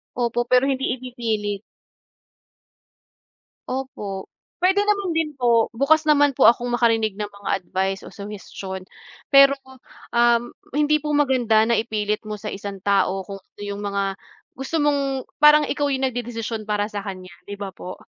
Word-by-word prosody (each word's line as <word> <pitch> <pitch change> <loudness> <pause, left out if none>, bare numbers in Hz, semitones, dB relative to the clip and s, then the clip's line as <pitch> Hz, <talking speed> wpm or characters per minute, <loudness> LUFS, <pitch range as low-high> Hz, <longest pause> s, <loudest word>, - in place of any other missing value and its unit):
Opo, 240 0 0
pero 250 +2 +3
hindi 265 -1 -1
ipipilit. 225 -5 -3 2.1
Opo, 210 -7 -5 0.3
pwede 380 +3 +3
naman 400 -4 0
din 320 -1 +1
po. 235 -2 +3
Bukas 275 +7 +3
naman 290 -2 +4
po - - +5
akong 240 +1 -3
makarinig 225 -3 +2
ng 210 0 -5
mga 200 0 -7
advice 190 +2 -2
o - - -10
suhestiyon. 195 -2 -7 0.5
Pero 275 0 +7
po, 265 0 -16 0.4
um, 240 0 +3 0.2
hindi 300 +1 +3
po 300 0 -2
maganda 255 -6 +3
na 235 -1 +2
ipilit 210 -2 -1
mo 215 - -4
sa 210 0 -6
isang 195 -1 -7
tao 195 -1 +1
kung 195 +1 -8
ano 195 - -22
yung 200 0 -4
mga 200 -1 -2 0.4
gusto 270 +5 -3
mong 275 -2 0 0.2
parang 300 0 +7
ikaw 290 0 -1
yung 270 -1 -1
nagdedesisyon 230 -2 -5
para 210 -1 +1
sa 205 -1 -4
kanya, 185 -2 -7 0.2
'di 205 - -5
ba 200 -1 -5
po? 180 +1 -8
235 Hz, 155 wpm, -22 LUFS, 205-270 Hz, 2.1 s, Pero